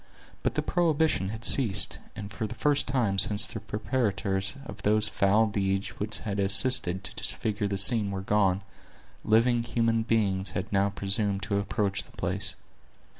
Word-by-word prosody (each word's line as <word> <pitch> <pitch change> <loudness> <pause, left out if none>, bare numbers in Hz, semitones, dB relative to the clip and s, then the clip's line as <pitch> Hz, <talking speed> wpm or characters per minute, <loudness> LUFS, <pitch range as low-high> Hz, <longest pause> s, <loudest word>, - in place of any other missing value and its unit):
But - - -1
the - - 0
prohibition 160 - +1
had 110 +2 -6
ceased; 105 -7 +2 0.2
and 100 -1 -8
for 110 - -3
the 120 - -8
first 145 +5 +1
time 110 -7 0
since 105 +1 +5
the - - -5
perpetrators 100 -4 -1
of - - -9
those 105 +1 +2
foul 105 +3 +2
deeds 95 -2 -1
which 105 +1 -2
had 100 -2 -4
assisted 95 -2 +2
to - - -6
disfigure 105 -1 -3
the 100 -1 -2
scene 105 +1 +3
were 95 -1 -4
gone, 95 -1 +1 0.6
living 115 +2 +3
human 115 -1 0
beings 100 -4 0
had 95 +3 -5
now 100 0 +2
presumed 100 0 -1
to 100 +1 -1
approach 100 -1 -1
the - - -21
place. - - -1
105 Hz, 165 wpm, -27 LUFS, 100-115 Hz, 0.6 s, since